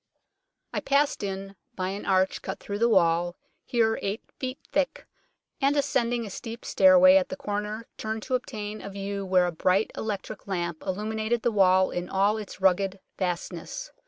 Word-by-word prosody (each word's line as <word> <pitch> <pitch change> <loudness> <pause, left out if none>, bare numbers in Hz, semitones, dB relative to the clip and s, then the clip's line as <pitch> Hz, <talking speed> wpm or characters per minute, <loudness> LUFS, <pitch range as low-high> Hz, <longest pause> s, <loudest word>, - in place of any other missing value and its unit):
I - - 0
passed 285 +1 +2
in 195 0 -4 0.2
by 185 0 -2
an 200 +2 -5
arch 190 -1 +2
cut - - -5
through 205 0 -5
the 235 +1 +4
wall, 175 -3 +3 0.3
here 225 -2 +1
eight 200 +3 -3 0.2
feet 260 0 -3
thick, 285 -2 0 0.6
and 280 +2 +3
ascending 240 -4 +1
a 205 - -7
steep 230 +4 -7
stair 280 -1 +6
way 275 +1 +8
at 275 - -4
a - - -2
corner 210 -3 -4
turned 220 0 -4
to 260 - -4
obtain 215 -4 -3
a - - -7
view 200 0 -4
where 185 -1 +4
a 175 - -1
bright 185 +5 +1
electric 210 -2 -5
lamp 175 -4 -2
illuminated 220 +4 -2
the 240 - +2
wall 190 -2 +4
in 175 0 -4
all 200 +3 +2
its 205 -3 -8
rugged 190 0 +2 0.2
vastness. 180 - -4
205 Hz, 175 wpm, -27 LUFS, 190-235 Hz, 0.6 s, way